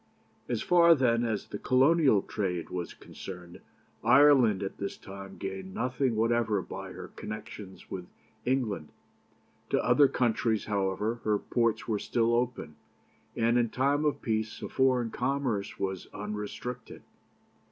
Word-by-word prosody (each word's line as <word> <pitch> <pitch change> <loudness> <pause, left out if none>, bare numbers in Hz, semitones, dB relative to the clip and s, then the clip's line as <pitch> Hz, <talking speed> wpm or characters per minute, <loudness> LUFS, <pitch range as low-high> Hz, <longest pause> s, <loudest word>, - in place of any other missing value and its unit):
"As 120 -3 -1
far, 170 -1 +6
then, 120 -4 +2
as 110 -3 -2
the 105 - -5
Colonial 135 - +4
trade 90 -5 -3
was 90 -1 -4
concerned, 90 -2 -10 0.4
Ireland 130 -9 +6
at 95 - -5
this 100 - -4
time 95 0 -10
gained 95 -1 -6
nothing 125 0 0
whatever 115 -1 +2
by - - -7
her - - -8
connection 105 -2 -8
with 90 -2 -6 0.4
England. 115 - -1 0.8
To - - +1
other 145 -1 +6
countries, 115 -3 0
however, 105 +3 -1
her 105 -1 +2
ports 115 0 0
were 110 -3 0
still 115 +2 +1
open, 120 -11 -1 0.6
and 115 +1 +3
in 120 -1 +1
time 140 +5 +1
of 150 -1 0
peace 110 -1 -2
a - - -4
foreign 130 -3 +2
commerce 125 -6 -1
was 95 -2 -3
unrestricted. 105 +4 -6
115 Hz, 135 wpm, -29 LUFS, 100-125 Hz, 0.8 s, far